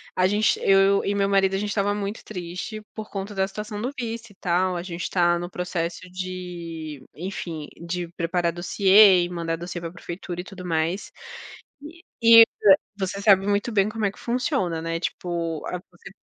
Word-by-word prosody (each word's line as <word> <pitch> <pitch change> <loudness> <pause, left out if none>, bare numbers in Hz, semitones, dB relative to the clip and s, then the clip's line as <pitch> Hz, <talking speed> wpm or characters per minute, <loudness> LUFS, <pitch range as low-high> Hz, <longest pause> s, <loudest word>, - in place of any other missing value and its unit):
a 185 0 +3
gente 210 +2 +2
eu 195 0 +4
e 200 - +1
meu 200 0 +2
marido, 195 -1 +3
a - - +1
gente 210 0 -2
estava 200 0 +1
muito 205 +1 -4
triste 185 +3 -6
por 215 -1 -7
conta 200 +1 -5
da 190 0 +1
situação 210 +1 -6
do 255 +3 -2
visto, 230 -2 -5
e - - -19
tal. 180 0 0
A 175 - -3
gente 175 -2 -6
está 175 -1 +2
no 175 0 -5
processo 175 -2 -3
de, 175 -5 -6
enfim, 170 -3 -5
de 175 0 -3
preparar 170 0 0
dossiê 190 +1 +6
e 175 - -3
mandar 165 -2 -3
dossiê 175 0 -6
para 165 - -4
a - - -16
prefeitura, 175 0 -6
e - - -10
tudo 185 -2 -10
mais. 165 +3 -1 0.7
E 335 +3 -11 0.2
e 230 0 +10 0.6
você 195 +1 -3
sabe 195 -2 +5
muito 205 +3 0
bem 200 0 +3
como 220 -1 -3
é 200 - +2
que - - -19
funciona, 235 - -1
né, 165 0 -3
tipo, 170 -3 -3
ah, 180 - -4
você 180 +2 -14
185 Hz, 190 wpm, -24 LUFS, 175-205 Hz, 0.7 s, e